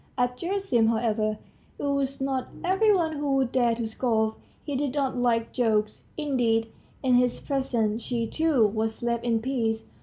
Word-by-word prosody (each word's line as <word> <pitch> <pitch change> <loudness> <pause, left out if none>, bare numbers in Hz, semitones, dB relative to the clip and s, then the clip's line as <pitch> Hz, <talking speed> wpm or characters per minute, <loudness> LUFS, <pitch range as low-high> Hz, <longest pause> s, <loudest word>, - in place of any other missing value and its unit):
At 250 -1 +1
Gerasim, 340 - +1
however, 220 -2 0 0.4
it - - -7
was 280 -1 0
not 265 -1 -1 0.2
every 385 +4 +3
one 325 -6 +1
who 285 -1 0
would 265 -2 +1
dare 240 -3 +2
to 230 0 -3
scoff; 220 -1 0 0.3
he 290 - -4
did 280 0 -1
not 275 -3 0
like 235 -2 +1
jokes; 215 -4 0
indeed, 235 -7 +1 0.3
in 255 -1 +3
his 245 0 +3
presence, 235 -5 -1
she, 235 -1 -2
too, 300 -2 +2
was 220 +2 -2
left 235 -1 0
in 230 -2 +1
peace. 230 -4 -1
245 Hz, 170 wpm, -26 LUFS, 225-275 Hz, 0.4 s, every